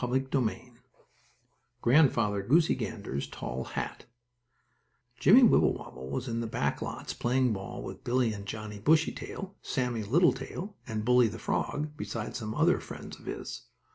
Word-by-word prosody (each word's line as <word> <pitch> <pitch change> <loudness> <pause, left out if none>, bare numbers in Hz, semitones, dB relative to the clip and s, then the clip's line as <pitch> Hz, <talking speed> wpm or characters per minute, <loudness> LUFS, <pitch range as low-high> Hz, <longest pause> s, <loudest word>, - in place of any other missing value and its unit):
STORY 125 +2 +2
XXIX 125 -2 -2 1.1
GRANDFATHER 120 -7 +4
GOOSEY 160 +5 +5
GANDER'S 100 - -4
TALL 65 -1 -5
HAT - - -5 1.1
Jimmie 220 - +7
Wibblewobble 65 - +2
was 130 - -3
in 115 -1 -2
the 115 - -2
back 70 -10 -1
lots, - - -5
playing 125 -1 +1
ball 95 -1 -6
with - - -8
Billie 120 -2 +1
and 100 -1 -8
Johnnie 105 0 -6
Bushytail, 160 - 0
Sammie 125 -4 -1
Littletail, 175 - +1
and 110 -2 -3
Bully, 125 -1 +5
the 110 +1 -5
frog, 150 +5 -2
besides 115 -5 -4
some 110 -1 -4
other - - +4
friends - - -9
of - - -16
his. - - -6
120 Hz, 140 wpm, -30 LUFS, 105-135 Hz, 1.1 s, Jimmie